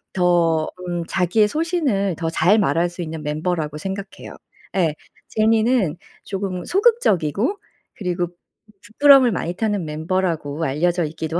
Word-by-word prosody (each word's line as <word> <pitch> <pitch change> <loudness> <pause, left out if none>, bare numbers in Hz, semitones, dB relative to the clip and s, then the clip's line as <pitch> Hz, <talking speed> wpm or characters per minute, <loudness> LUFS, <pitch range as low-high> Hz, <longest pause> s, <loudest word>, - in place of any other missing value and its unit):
더 170 -3 +2 0.2
음 175 -1 -2
자기의 190 +4 +2
소신을 280 - 0
더 165 -2 -2
잘 175 +6 +3
말할 175 -4 +2
수 175 +1 -8
있는 160 -2 -6
멤버라고 150 0 -2
생각해요. 195 +3 -7 0.4
예. 170 -5 +2 0.4
제니는 220 -5 +2 0.3
조금 190 -2 -4
소극적이고 360 - +1 0.4
그리고 180 -3 -2 0.6
부끄럼을 270 +1 +6
많이 175 -2 -3
타는 210 -2 -1
멤버라고 160 -1 -2
알려져 170 +4 0
있기도 160 +2 -3
180 Hz, 290 characters per minute, -21 LUFS, 165-210 Hz, 0.6 s, 부끄럼을